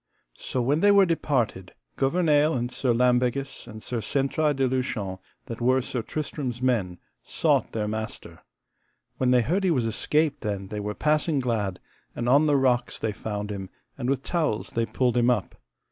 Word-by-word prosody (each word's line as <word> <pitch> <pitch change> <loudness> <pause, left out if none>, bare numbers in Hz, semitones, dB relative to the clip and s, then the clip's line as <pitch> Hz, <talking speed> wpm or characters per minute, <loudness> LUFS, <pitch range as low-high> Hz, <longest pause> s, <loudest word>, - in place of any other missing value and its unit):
So 125 - -2
when 140 +5 +2
they 205 - +5
were 200 -1 +6
departed, 125 - -1 0.2
Gouvernail, 150 +1 +2
and 120 0 -2
Sir 125 0 0
Lambegus, 125 +2 +1
and 110 -2 -10
Sir 120 -2 -3
Sentraille 140 +6 0
de 135 -1 +1
Lushon, 125 -7 -2 0.3
that 115 0 -7
were 130 +2 +3
Sir 125 -1 -3
Tristram's 135 -2 -4
men, 115 -9 0 0.2
sought - - +1
their 105 -2 -2
master. 110 0 -5 0.8
When 130 - +1
they 125 -1 +5
heard 185 - 0
he 190 - +3
was 130 -8 +1
escaped 150 +6 0
then 100 -3 -3
they 105 - -4
were 105 0 -4
passing 155 0 +1
glad; 110 -7 -1 0.4
and 120 - -3
on 140 +5 +5
the 145 - +3
rocks 125 -2 +1
they 110 - -2
found 105 0 -5
him, 95 -2 -6 0.3
and 120 - -3
with 135 0 0
towels 155 -11 -1
they 115 0 -1
pulled 125 -2 0
him 120 0 +3
up. 115 -7 0
125 Hz, 175 wpm, -26 LUFS, 110-145 Hz, 0.8 s, were